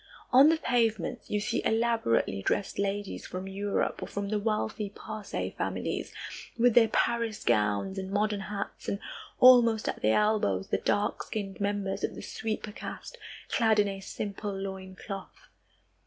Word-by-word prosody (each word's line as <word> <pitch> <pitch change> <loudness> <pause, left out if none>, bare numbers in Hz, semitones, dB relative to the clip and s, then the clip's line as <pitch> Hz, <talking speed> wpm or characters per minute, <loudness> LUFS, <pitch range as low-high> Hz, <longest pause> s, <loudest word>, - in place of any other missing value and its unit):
On 270 +4 +9
the 325 - +3
pavements 230 - 0
you 210 - +1
see 210 - -1
elaborately 225 - +1
dressed 195 - -1
ladies 200 0 -2
from 185 +1 -5
Europe, 200 +1 -1
or - - -4
from 200 0 -4
the 210 0 0
wealthy 210 - -1
Parsee 215 0 -5
families, - - -3 0.5
with 240 0 +5
their 230 -1 +7
Paris 230 0 0
gowns 105 - +1
and 190 0 -5
modern 205 +1 +1
hats, 200 +1 -5
and 200 - -1 0.4
almost 240 -4 +7
at - - -2
their 110 +1 +4
elbows 210 - +1
the - - +1
dark 205 0 0
skinned 200 -2 -5
members 200 -1 -1
of - - -1
the - - -8
sweeper 215 -1 -4
caste, - - -8 0.3
clad 225 -3 +3
in 205 -1 +4
a 195 -1 -4
simple 200 +1 -4
loin 190 -1 -6
cloth. 195 0 -8
205 Hz, 155 wpm, -29 LUFS, 195-220 Hz, 0.5 s, On